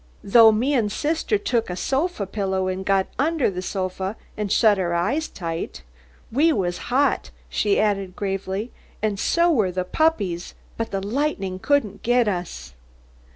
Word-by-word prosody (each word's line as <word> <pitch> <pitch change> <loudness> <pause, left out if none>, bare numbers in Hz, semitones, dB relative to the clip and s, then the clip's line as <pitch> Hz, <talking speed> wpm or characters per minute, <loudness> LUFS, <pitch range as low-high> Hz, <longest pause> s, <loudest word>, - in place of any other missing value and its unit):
Tho 225 +2 +7
me 245 +7 +1
and 230 -6 +2
thithter 320 - 0
took 245 - -1
a - - -2
thofa 270 - -1
pillow 190 -1 -1
and 185 0 -2
got 195 -1 +2
under 300 -5 +2
the 180 -1 -4
thofa 190 +1 -3 0.2
and 210 -2 -3
shut 210 -3 +4
our 175 -2 0
eyeth 245 - 0
tight. 165 - -5 0.5
We 300 +8 +4
wath 180 - -1
hot," 275 +3 +2 0.2
she 205 -1 +1
added, 195 -3 0
gravely, 195 +3 -3 0.3
"and 210 -2 0
tho 340 +7 +3
wath 205 - +1
the 185 - 0
puppieth, 195 - 0 0.2
but 225 0 -3
the 195 0 -3
lightnin' 205 -6 -1
couldn't 220 -6 0
get 245 -1 +3
uth." 175 - -4
205 Hz, 155 wpm, -23 LUFS, 190-255 Hz, 0.5 s, Tho